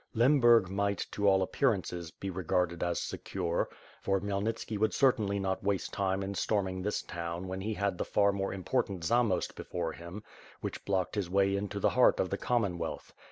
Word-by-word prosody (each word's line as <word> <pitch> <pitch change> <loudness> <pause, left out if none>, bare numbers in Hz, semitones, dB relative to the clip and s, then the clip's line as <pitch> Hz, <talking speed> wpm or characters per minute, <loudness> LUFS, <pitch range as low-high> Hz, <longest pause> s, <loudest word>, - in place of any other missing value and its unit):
Lemburg 120 -4 +5
might, 100 +1 -1
to 100 0 0
all 95 -1 +5
appearances, 95 - 0
be 95 +3 -6
regarded 90 -1 0
as 85 -1 0
secure; 85 -3 -2 0.3
for 95 0 +1
Khmyelnitski 100 +3 -2
would 110 +1 +2
certainly 110 -7 +3
not 95 0 -2
waste 100 -1 -1
time 95 0 0
in 100 +1 -3
storming 95 -2 0
this 105 +2 -1
town 85 +1 -5
when 95 +1 -4
he 110 +2 -2
had 100 -3 -1
the - - +1
far 100 -1 +3
more 95 0 -2
important 95 -1 -1
Zamost 115 -1 +2
before 85 -2 -3
him; 85 +6 -9 0.4
which - - -5
blocked 95 -2 0
his 100 -5 -2
way 100 +1 +3
into 100 0 -3
the - - +3
heart 125 - +4
of 95 - 0
the 100 - 0
Commonwealth. 95 -9 -1
100 Hz, 180 wpm, -31 LUFS, 90-105 Hz, 0.4 s, Lemburg